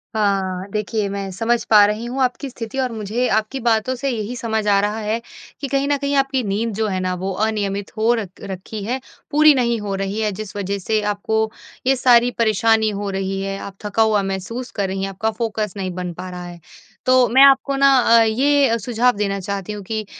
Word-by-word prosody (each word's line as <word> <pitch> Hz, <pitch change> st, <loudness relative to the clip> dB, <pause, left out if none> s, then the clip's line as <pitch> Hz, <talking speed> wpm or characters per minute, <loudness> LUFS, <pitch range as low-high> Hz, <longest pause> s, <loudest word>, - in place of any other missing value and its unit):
हाँ, 195 Hz, -3 st, 0 dB
देखिए 210 Hz, 0 st, -1 dB
मैं 195 Hz, -1 st, -4 dB
समझ 230 Hz, +5 st, 0 dB
पा 210 Hz, -2 st, +8 dB
रही 210 Hz, +3 st, -2 dB
हूँ 255 Hz, +3 st, -3 dB
आपकी 255 Hz, +2 st, -2 dB
स्थिति 230 Hz, 0 st, -7 dB
और 255 Hz, -2 st, 0 dB
मुझे 225 Hz, +3 st, -2 dB
आपकी 220 Hz, +5 st, 0 dB
बातों 230 Hz, +1 st, +1 dB
से 275 Hz, +2 st, -2 dB
यही 230 Hz, 0 st, -3 dB
समझ 220 Hz, -2 st, -2 dB
आ 200 Hz, -1 st, +4 dB
रहा 210 Hz, +2 st, -1 dB
है 215 Hz, +2 st, -2 dB, 0.4 s
कि 280 Hz, -, -2 dB
कहीं 275 Hz, +1 st, 0 dB
न 290 Hz, -, +2 dB
कहीं 280 Hz, 0 st, -1 dB
आपकी 270 Hz, -2 st, +1 dB
नींद 210 Hz, +2 st, -1 dB
जो 220 Hz, +1 st, 0 dB
है 190 Hz, -2 st, -2 dB
ना 185 Hz, 0 st, -1 dB
वो 195 Hz, -, -1 dB
अनियमित 205 Hz, -2 st, -2 dB
हो 225 Hz, +2 st, +3 dB
र 210 Hz, -, -4 dB
रखी 195 Hz, +2 st, -7 dB
है, 250 Hz, +6 st, -2 dB, 0.3 s
पूरी 305 Hz, +1 st, +6 dB
नहीं 235 Hz, -3 st, +1 dB
हो 200 Hz, -1 st, -3 dB
रही 195 Hz, +2 st, -3 dB
है 215 Hz, -1 st, 0 dB
जिस 205 Hz, +1 st, -7 dB
वज़ह 200 Hz, 0 st, -2 dB
से 215 Hz, +3 st, 0 dB
आपको 220 Hz, +2 st, -1 dB, 0.4 s
ये 270 Hz, -, +5 dB
सारी 245 Hz, -1 st, +4 dB
परेशानी 220 Hz, 0 st, +3 dB
हो 205 Hz, -1 st, -4 dB
रही 195 Hz, 0 st, -2 dB
है, 195 Hz, 0 st, -3 dB
आप 200 Hz, -, -8 dB
थका 210 Hz, +2 st, 0 dB
हुआ 215 Hz, -2 st, +2 dB
महसूस 195 Hz, +6 st, -4 dB
कर 200 Hz, -2 st, 0 dB
रही 190 Hz, 0 st, -3 dB
हैं, 195 Hz, -, -2 dB
आपका 220 Hz, +4 st, -2 dB
फ़ोकस 215 Hz, -2 st, -3 dB
नहीं 185 Hz, -1 st, -3 dB
बन 180 Hz, -1 st, -5 dB
पा 185 Hz, +2 st, -7 dB
रहा 180 Hz, 0 st, -7 dB
है। 175 Hz, -1 st, -10 dB, 0.5 s
तो 255 Hz, -1 st, +5 dB
मैं 260 Hz, +3 st, +5 dB
आपको 275 Hz, 0 st, +4 dB
ना 275 Hz, 0 st, +5 dB, 0.2 s
अ, -, -, +6 dB
ये 265 Hz, +2 st, +3 dB
सुझाव 245 Hz, +3 st, +2 dB
देना 200 Hz, -1 st, -1 dB
चाहती 200 Hz, +1 st, -4 dB
हूँ 205 Hz, -1 st, -7 dB
कि 215 Hz, +2 st, -4 dB
215 Hz, 220 wpm, -20 LUFS, 195-240 Hz, 0.5 s, पा